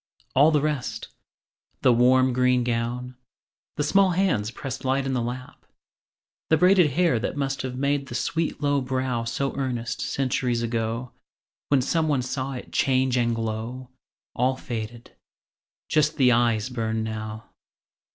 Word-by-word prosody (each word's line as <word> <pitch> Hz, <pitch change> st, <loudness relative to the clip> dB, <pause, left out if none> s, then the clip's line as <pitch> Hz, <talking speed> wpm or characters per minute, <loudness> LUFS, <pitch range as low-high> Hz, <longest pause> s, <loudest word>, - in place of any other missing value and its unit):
All 145 Hz, +4 st, +6 dB
the 150 Hz, -3 st, +2 dB
rest 150 Hz, -4 st, -3 dB, 0.7 s
The 125 Hz, -, +6 dB
warm 130 Hz, +2 st, +4 dB
green 125 Hz, 0 st, +3 dB
gown, 120 Hz, +1 st, -2 dB, 0.6 s
the 150 Hz, -, 0 dB
small 195 Hz, +6 st, +4 dB
hands 140 Hz, -, +1 dB
pressed 135 Hz, +2 st, -6 dB
Light 135 Hz, +1 st, +1 dB
in 135 Hz, -, -1 dB
the 125 Hz, -, 0 dB
lap, 125 Hz, +2 st, -6 dB, 0.9 s
the 160 Hz, -, +5 dB
braided 180 Hz, -1 st, +5 dB
hair 170 Hz, -6 st, +2 dB
That 125 Hz, -, -3 dB
must 135 Hz, -1 st, -1 dB
have 125 Hz, -1 st, -5 dB
made 140 Hz, +1 st, 0 dB
the 120 Hz, -, -7 dB
sweet 160 Hz, +3 st, -2 dB
low 145 Hz, -1 st, +2 dB
brow 130 Hz, -2 st, -2 dB
So 135 Hz, +4 st, -2 dB
earnest, 125 Hz, -4 st, -3 dB
centuries 125 Hz, -3 st, -1 dB
ago, 115 Hz, +1 st, -2 dB, 0.6 s
When 140 Hz, -3 st, +3 dB
some 160 Hz, +3 st, +1 dB
one 140 Hz, -4 st, +1 dB
saw 130 Hz, +1 st, -3 dB
it 125 Hz, -, -8 dB
change 130 Hz, -2 st, +2 dB
and 120 Hz, -2 st, +1 dB
glow 115 Hz, +3 st, -4 dB, 0.5 s
All 130 Hz, +2 st, +2 dB
faded! 120 Hz, -2 st, -7 dB, 0.7 s
Just 155 Hz, 0 st, +2 dB
the 130 Hz, -3 st, +5 dB
eyes 115 Hz, -1 st, +2 dB
burn 110 Hz, -2 st, -2 dB
now. 110 Hz, 0 st, -6 dB
130 Hz, 150 wpm, -25 LUFS, 120-140 Hz, 0.9 s, All